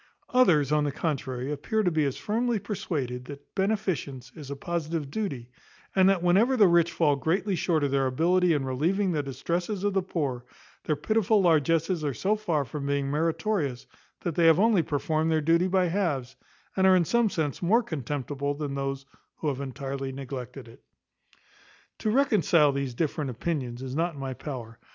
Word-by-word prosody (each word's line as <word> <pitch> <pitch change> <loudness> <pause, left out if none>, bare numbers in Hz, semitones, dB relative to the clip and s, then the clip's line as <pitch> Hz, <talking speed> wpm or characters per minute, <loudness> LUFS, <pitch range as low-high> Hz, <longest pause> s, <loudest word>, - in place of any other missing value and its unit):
Others, 165 - +4
on 150 -1 +3
the 145 - 0
contrary, 135 -3 -3
appear 215 +10 -1
to 180 - +2
be 155 -2 +1
as 135 - -2
firmly 230 +2 0
persuaded, 150 - -4
that 145 +1 -11
beneficence 190 - -2
is 150 -5 -9
a 140 - -4
positive 160 -2 -3
duty, 140 - -4 0.4
and 190 0 +5
that 190 -3 +1
whenever 210 +9 +4
the 205 -4 +7
rich 170 -1 +4
fall 150 -4 +2
greatly 185 +8 0
short 165 -3 +1
of 140 - 0
their 135 -1 +2
ability 175 +7 +2
in 145 -3 0
relieving 175 +10 0
the 155 -3 0
distresses 175 +8 -3
of 205 -1 +1
the 195 - +2
poor, 145 -9 -3 0.4
their 155 - +1
pitiful 215 +4 +2
largesses 165 +1 +2
are 145 -4 -1
so 205 +3 +1
far 170 -9 -1
from 140 +3 -5
being 140 -1 0
meritorious, 160 - -1 0.4
that 170 - -2
they 165 +1 +4
have 165 +1 +6
only 215 -3 +4
performed 155 +1 -1
their 160 - +3
duty 165 +4 +3
by 185 0 +2
halves, 165 -9 -1 0.4
and 190 0 +4
are 190 - +7
in 175 -2 +3
some 235 +4 +2
sense 155 -7 -2
more 220 +8 +3
contemptible 145 - -3
than 145 -1 -4
those 135 0 -3 0.3
who 155 - -2
have 140 -1 -3
entirely 135 0 -4
neglected 130 -1 -7
it. 115 - -16 1.2
To 215 - -1
reconcile 200 - +4
these 135 -3 -3
different 150 0 -1
opinions 125 -1 -3
is 130 -1 -5
not 165 +2 -1
in - - -9
my 135 -1 -4
power. 120 -5 -7
155 Hz, 185 wpm, -27 LUFS, 140-185 Hz, 1.2 s, the